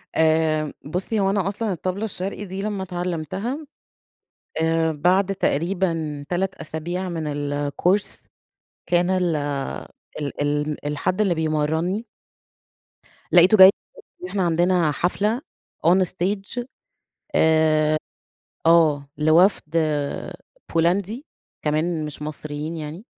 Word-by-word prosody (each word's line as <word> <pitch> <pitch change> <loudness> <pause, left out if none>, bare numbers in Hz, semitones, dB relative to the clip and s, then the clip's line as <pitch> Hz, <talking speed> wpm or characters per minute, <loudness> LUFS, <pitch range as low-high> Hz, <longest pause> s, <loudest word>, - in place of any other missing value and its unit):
آآ 155 -1 +2
بُصي 185 +8 -2
هو 195 -1 +2
أنا 195 -2 0
أصلًا 210 +2 -2
الطبلة 185 +5 -3
الشرقي 200 0 -4
دي 190 +1 -5
لما 205 -2 -2
اتعلمتها، 180 - -3 1.0
آآ 160 0 +2
بعد 185 +6 +2
تقريبًا 165 -4 -1
3 185 +1 -1
أسابيع 175 +4 -4
من 160 -3 -3
الcourse 145 +7 0 0.7
كان 175 +1 +2
ال 180 -3 +1 0.8
ال 145 0 -3
ال 145 0 -1
الحد 150 +7 -1
اللي 190 -5 +3
بيمرنّي، 160 +7 0 1.3
لقيته 180 +5 +7
جاي 190 -1 +11 0.6
إحنا 195 -1 0
عندنا 175 -1 +2
حفلة 210 - 0 0.5
on 185 +2 +5
stage 195 +7 -2 0.7
آآ 155 -1 +3 0.7
آه 155 -4 +4
لوفد 160 +1 +3
آآ 150 -3 -1 0.4
بولندي، 195 - +1 0.4
كمان 155 +1 0
مش 150 0 -8
مصريين 155 +1 -5
يعني، 160 +6 -7
170 Hz, 105 wpm, -23 LUFS, 155-190 Hz, 1.3 s, جاي